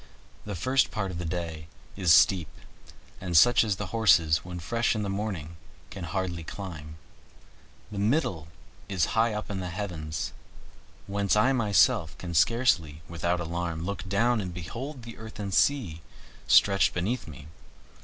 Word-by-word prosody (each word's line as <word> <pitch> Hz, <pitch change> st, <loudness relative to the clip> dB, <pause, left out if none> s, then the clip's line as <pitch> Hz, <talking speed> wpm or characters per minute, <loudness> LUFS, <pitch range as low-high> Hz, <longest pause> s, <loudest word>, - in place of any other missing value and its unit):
The 105 Hz, -2 st, -4 dB
first 130 Hz, +10 st, +2 dB
part 100 Hz, -4 st, -3 dB
of 85 Hz, -, -6 dB
the 90 Hz, -, -4 dB
way 80 Hz, -2 st, -6 dB, 0.3 s
is 95 Hz, -4 st, +2 dB
steep, 90 Hz, -1 st, +5 dB, 0.7 s
and 90 Hz, -3 st, +1 dB
such 115 Hz, +5 st, +6 dB
as 105 Hz, -3 st, 0 dB
the 105 Hz, -, -4 dB
horses 85 Hz, -8 st, +4 dB
when 90 Hz, 0 st, -7 dB
fresh 115 Hz, +8 st, 0 dB
in 105 Hz, -, -2 dB
the 100 Hz, -, -2 dB
morning 95 Hz, -6 st, -4 dB, 0.3 s
can 95 Hz, -1 st, -6 dB
hardly 85 Hz, 0 st, -3 dB
climb; 80 Hz, -4 st, -8 dB, 1.0 s
the 100 Hz, -, -5 dB
middle 100 Hz, -, 0 dB, 0.4 s
is 95 Hz, -5 st, 0 dB
high 115 Hz, +1 st, +3 dB
up 105 Hz, 0 st, -5 dB
in 95 Hz, -, -3 dB
the 90 Hz, -1 st, -4 dB
heavens, 80 Hz, -9 st, -4 dB, 0.7 s
whence 100 Hz, 0 st, 0 dB
I 125 Hz, +6 st, +4 dB
myself 105 Hz, -6 st, +2 dB
can 85 Hz, -2 st, -6 dB
scarcely, 85 Hz, -, +2 dB
without 85 Hz, +1 st, -1 dB
alarm, 85 Hz, -1 st, -3 dB
look 100 Hz, 0 st, -5 dB
down 115 Hz, +3 st, +2 dB
and 90 Hz, -2 st, -5 dB
behold 120 Hz, -, -7 dB
the 115 Hz, 0 st, -10 dB
earth 110 Hz, -1 st, -10 dB
and 100 Hz, -2 st, -4 dB
sea 100 Hz, -, +1 dB, 0.5 s
stretched 100 Hz, -1 st, +4 dB
beneath 105 Hz, +9 st, -2 dB
me. 75 Hz, -2 st, -10 dB
95 Hz, 155 wpm, -27 LUFS, 85-110 Hz, 1.0 s, such